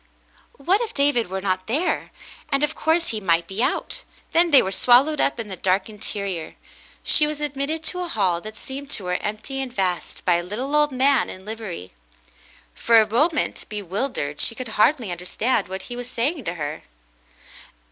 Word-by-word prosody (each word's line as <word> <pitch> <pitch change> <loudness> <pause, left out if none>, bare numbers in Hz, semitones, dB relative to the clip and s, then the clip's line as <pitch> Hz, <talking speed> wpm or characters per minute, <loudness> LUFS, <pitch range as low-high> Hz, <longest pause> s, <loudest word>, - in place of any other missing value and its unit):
What 370 - +2
if 455 -1 -4
David 280 -6 +2
were 190 +1 -3
not 185 -1 -1
there! 295 +11 0 0.4
And 275 0 +1
of 300 +1 +1
course, 325 +2 +1
he 220 - -2
might 170 -4 +2
be 195 +5 -4
out. - - 0 0.3
Then 340 +1 +4
they 285 -4 +7
were 190 - -2
swallowed 260 +9 +4
up 280 - +1
in 225 - -4
the 190 - -6
dark 190 +1 +1
interior. 200 -5 -5 0.5
She 300 - +5
was 300 -1 -4
admitted 295 +2 -2
to 360 +3 0
a 355 - -3
hall 190 - +1
that 215 +2 -9
seemed 275 +4 -7
to 200 - -1
her 180 0 0
empty 215 +6 -4
and 260 -2 -4
vast, 185 -5 -2
by 175 -2 +4
a 175 - -3
little 245 +11 -3
old 295 -1 +4
man 265 0 +3
in 185 +1 -10
livery. 210 - -7 0.8
For 230 - +5
a 215 - +3
moment, 300 +9 +1
bewildered, 200 - -2
she 230 - +1
could 250 0 -6
hardly 220 0 +2
understand 195 +6 -1
what 190 0 -6
he 245 - -6
was 245 0 -6
saying 260 +3 -1
to 170 - -3
her. 150 -1 -4
230 Hz, 190 wpm, -23 LUFS, 190-285 Hz, 0.8 s, they